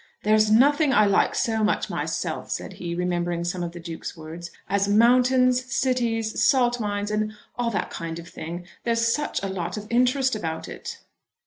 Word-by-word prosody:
"There's 215 0 +4
nothing 285 +6 +4
I 215 -3 +5
like 200 - +2
so 225 -3 0
much 210 - +1
myself," - - -3
said - - -4
he, 170 -1 -5
remembering 175 -1 -1
some 175 +1 -3
of 170 -1 -3
the 175 - -9
Duke's 165 0 -7
words, 165 +2 -8 0.2
"as 200 0 +1
mountains, 250 +3 +4
cities, 235 -4 0
salt 245 -3 +3
mines, 205 -1 -2
and 215 0 -1 0.2
all 240 -1 0
that 210 - -2
kind 165 -1 -5
of 170 0 -9
thing. 170 +3 -7 0.2
There's 230 0 +2
such 295 -8 -2
a - - -1
lot 185 0 -4
of 210 - -6
interest 255 +1 +2
about 160 -6 -4
it." - - -7
215 Hz, 180 wpm, -24 LUFS, 175-245 Hz, 0.2 s, I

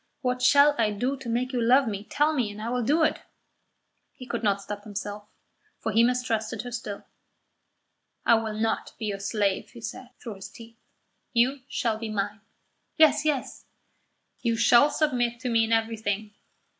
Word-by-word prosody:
What 250 -1 -1
shall 285 +3 +6
I 220 -2 +3
do 245 +7 -1
to 260 -3 -7
make 250 +3 -1
you 245 - 0
love 255 +3 +4
me? 205 -2 -3
Tell 300 +6 +1
me, 250 -8 0
and 205 +1 -9
I 220 +2 -4
will 250 0 0
do 295 +8 +2
it." 315 - +1 0.9
He 255 - -11
could 235 -1 -3
not 200 -3 +1
stop 205 +1 -7
himself, 205 0 -6 0.5
for 220 - -3
he 225 +2 +4
mistrusted 230 -3 0
her 245 - -7
still. 220 -4 -6 1.2
"I - - +6
will 220 -1 +1
not 225 0 -1
be 220 - -5
your 200 -2 -3
slave," 200 -1 -1
he 235 - -13
said, 240 +2 -7
through 220 -5 -7
his 195 - -9
teeth. 230 0 -14 0.5
"You 255 +4 +3
shall 235 -5 -1
be 225 -1 -4
mine." 205 +1 -3 0.6
"Yes, 310 -1 +5
yes." 290 -4 -2 0.8
"You 230 -2 +1
shall 235 +5 +6
submit 245 -6 0
to 255 - -2
me 230 -1 +3
in 225 - -5
everything. 220 -2 -1
230 Hz, 180 wpm, -26 LUFS, 215-250 Hz, 1.2 s, shall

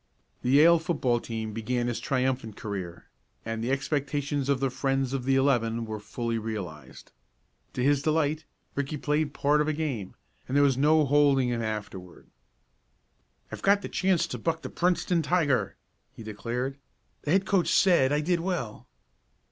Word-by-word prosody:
The 125 - -2
Yale 160 +5 +6
football 140 -7 0
team 110 -2 -5
began 120 +2 -1
its 120 - -2
triumphant 130 -4 -1
career, 95 -6 -6 0.4
and 115 0 -3
the 120 - -2
expectations 140 0 -1
of 140 -2 +2
the 135 -1 0
friends 135 0 -1
of 130 -2 -3
the 135 0 +3
eleven 115 -4 +1
were 110 -1 -5
fully 115 +2 -3
realized. 90 -12 -7 0.6
To 125 - -2
his 140 +1 +3
delight 155 0 0 0.3
Ricky 140 +2 -3
played 150 +1 0
part 150 +1 +2
of 150 - 0
a 155 - +1
game, 135 -11 -4 0.3
and 135 - 0
there 145 - +5
was 135 -2 +3
no 150 +3 +4
holding 140 -2 +3
him 120 -1 -1
afterward. 105 -5 -6 1.3
"I've - - -7
got 200 +1 +3
a - - -5
chance 185 -3 +1
to - - -5
buck 165 -1 -2
the - - -6
Princeton 175 -1 +1
tiger!" 145 - +1 0.4
he 115 - -10
declared. 120 +6 -4 0.4
"The 150 - -1
head 190 0 +3
coach 190 -3 +1
said 170 -9 +4
I 150 +1 +2
did 170 +2 +1
well!" 165 - -4
135 Hz, 165 wpm, -27 LUFS, 115-150 Hz, 1.3 s, Yale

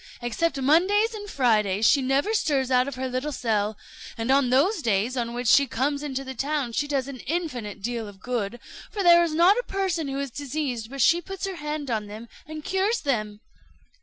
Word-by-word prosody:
Except 270 +5 -1
Mondays 375 - +3
and 410 -1 -7
Fridays, 215 - +2
she 280 - +4
never 270 +11 +1
stirs 275 - +1
out 250 +1 +3
of 280 - -5
her 260 +1 -3
little 255 +4 -3
cell; 215 -5 -1 0.4
and 230 +3 -1
on 270 -2 +3
those 320 - +2
days 225 +1 0
on 235 -1 -2
which 245 0 -3
she 280 +5 +6
comes 280 +5 -1
into 270 -2 -4
the 265 0 -7
town 275 0 -2
she 290 +5 -1
does 275 -3 -1
an 275 -2 -8
infinite 250 - -4
deal 230 -1 -3
of 200 -1 -12
good; 240 -1 -3 0.3
for 410 -2 -2
there 345 -1 +7
is 325 -2 -1
not 365 +7 +5
a - - -2
person 370 -5 -1
who 275 0 -3
is 280 -2 -4
diseased 270 -5 -4
but 275 0 -4
she 345 +1 +4
puts 385 +3 -6
her 385 -2 -5
hand 300 -3 -4
on 215 -2 -2
them 220 +3 -9 0.2
and 310 -1 -8
cures 395 +5 0
them." 215 -7 -2
270 Hz, 210 wpm, -25 LUFS, 235-315 Hz, 0.4 s, there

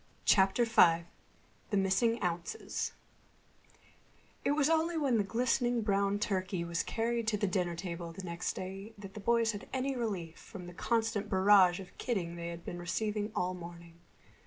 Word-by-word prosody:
CHAPTER 195 +4 +4
V 170 -7 +5 0.7
THE 205 - +1
MISSING 225 +5 +2
OUNCES 175 - -2 1.5
It 285 - +2
was 295 -1 +3
only 325 +1 +2
when 270 -7 +2
the - - +3
glistening 240 +2 +1
brown 200 -1 +2
turkey 190 -3 -1
was 170 0 -1
carried 230 0 -1
to 215 -2 +2
the 205 - 0
dinner 180 -3 0
table 170 -1 -5
the 185 +3 -9
next 170 0 -3
day 195 +4 -7
that 195 -1 -10
the 210 - -7
boys 230 +1 +2
had 205 -1 -8
any 265 +1 -1
relief 195 -9 -3
from 190 -5 -10
the 175 - -9
constant 225 0 0
barrage 190 -2 +5
of 190 -2 -11
kidding 180 -8 -2
they 170 0 -5
had 170 0 -7
been 175 - -5
receiving 210 +4 -2
all 180 +1 0
morning. 170 -1 -10
195 Hz, 165 wpm, -32 LUFS, 175-230 Hz, 1.5 s, V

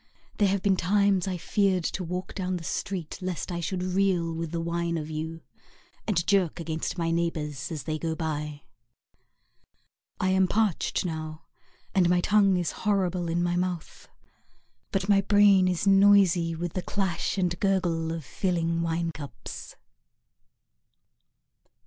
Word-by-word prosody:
There 205 - +5
have 195 0 0
been 195 -2 +3
times 200 0 +2
I 185 -1 -2
feared 190 0 +1
to 185 - -2
walk 180 +2 -4
down 185 -1 -2
the 170 - -8
street 175 -1 -4
Lest 180 -1 -3
I 170 - -2
should 180 +2 -2
reel 185 -3 +1
with 165 0 -4
the 170 - -2
wine 170 0 -1
of 155 0 -5
you, 160 +1 -4 0.7
And 175 -6 +1
jerk 185 -4 +2
against 160 +1 -3
my 165 -1 0
neighbours 155 -4 -2
As 155 -5 -4
they 155 +3 -3
go 160 0 -2
by. 150 -2 -4 1.6
I 185 - +1
am 190 0 +3
parched 210 -3 0
now, 155 -2 -5 0.5
and 180 -3 +4
my 180 0 +4
tongue 200 0 +4
is 175 -2 -1
horrible 185 -4 0
in 170 +1 0
my 175 0 0
mouth, 180 -2 -3 0.8
But 190 0 -1
my 200 -1 +5
brain 200 -2 +5
is 180 +1 0
noisy 195 -4 +5
With 170 0 -4
the 185 - -2
clash 190 -1 -2
and 175 -2 0
gurgle 175 -5 +1
of 165 -3 -5
filling 170 -1 -1
wine 165 0 -1
cups. 145 -3 -9
175 Hz, 150 wpm, -27 LUFS, 165-190 Hz, 1.6 s, There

